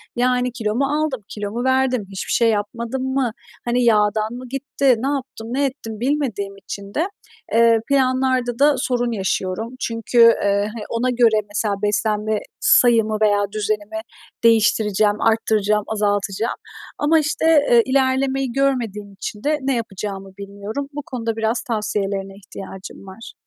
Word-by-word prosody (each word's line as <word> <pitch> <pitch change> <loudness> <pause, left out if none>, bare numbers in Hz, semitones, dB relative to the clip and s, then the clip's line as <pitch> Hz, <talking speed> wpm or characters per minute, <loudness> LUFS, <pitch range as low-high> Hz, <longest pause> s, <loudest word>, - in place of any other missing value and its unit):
Yani, 250 0 +1
kilo 220 -3 -2
mu 275 +3 +2
aldım, 290 -4 -1
kilo 205 -1 -5
mu 240 +3 -3
verdim, 260 -2 +2
hiçbir 195 -1 -5
şey 230 -1 +4
yapmadım 230 +4 -2
mı, 260 -4 +1 0.3
hani, 245 +1 +1
yağdan 215 -1 +2
mı 250 +1 -8
gitti, 270 -1 +1
ne 265 - -2
yaptım, 265 -5 -4
ne 280 +1 +1
ettim 225 -5 -5
bilmediğim 245 -8 -2
için 200 0 -8
de, 330 +4 0 0.5
eee, 230 0 +5
planlarda 255 -2 +1
da 290 +1 +5
sorun 245 -2 0
yaşıyorum. 195 0 -2
Çünkü, 230 +1 -3 0.3
eee, 200 +1 +2
hani, 225 -2 -6
ona 235 +2 0
göre 235 -3 +3
mesela 205 0 -1
beslenme 210 +1 0 0.2
sayımı 225 -3 +4
veya 205 -1 +3
düzenimi 215 +1 -2 0.4
değiştireceğim, 215 -2 +3
arttıracağım, 215 -2 +2
azaltacağım 205 0 -1 0.4
ama, 315 +2 +3
işte, 310 +1 -1 0.3
eee, 235 -1 +7
ilerlemeyi 265 0 +1
görmediğim 235 -7 -1
için 205 +2 -7
de 300 +1 +1
ne 270 0 0
yapacağımı 195 -3 -5
bilmiyorum. 200 +7 -6
Bu 295 - -4
konuda 230 -3 -3
biraz 225 +1 0
tavsiyelerine 200 -4 -2
ihtiyacım 195 -1 -10
var. 225 +7 -10
225 Hz, 145 wpm, -21 LUFS, 210-255 Hz, 0.5 s, eee